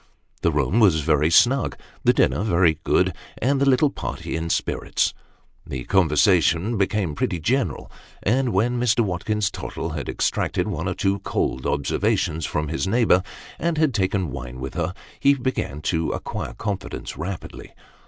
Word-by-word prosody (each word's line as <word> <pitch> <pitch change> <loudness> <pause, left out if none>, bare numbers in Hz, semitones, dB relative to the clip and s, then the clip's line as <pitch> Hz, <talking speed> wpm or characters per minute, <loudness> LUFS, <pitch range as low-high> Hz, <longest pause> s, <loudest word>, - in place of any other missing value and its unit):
The 85 - +2
room 75 - +1
was 90 -8 +5
very 75 0 +2
snug, 120 +9 +4 0.3
the - - +6
dinner - - +2
very 85 -6 +2
good, - - +2 0.2
and 135 +3 +1
the 140 - +4
little 135 +2 +4
party - - -5
in 80 0 -3
spirits. - - 0 0.5
The 65 -2 -5
conversation 90 - +3
became 100 -4 0
pretty 85 +3 -1
general, 125 - -1 0.3
and 125 +4 +2
when 120 +5 +1
Mr. 120 -1 +3
Watkins 100 +1 -1
Tottle - - -5
had - - -4
extracted - - 0
one 90 -3 -2
or 90 - -3
two 100 0 0
cold 65 -1 -2
observations 75 +2 0
from 75 0 -2
his 80 +4 -1
neighbour, 105 -3 +4 0.4
and 170 0 0
had 155 -4 +2
taken 95 - 0
wine 65 -2 -7
with 65 +1 -5
her, 90 - -2 0.2
he 140 0 +5
began 125 - -3
to 80 -2 0
acquire - - -5
confidence 100 -4 -5
rapidly. 85 +3 -7
95 Hz, 155 wpm, -23 LUFS, 80-115 Hz, 0.5 s, the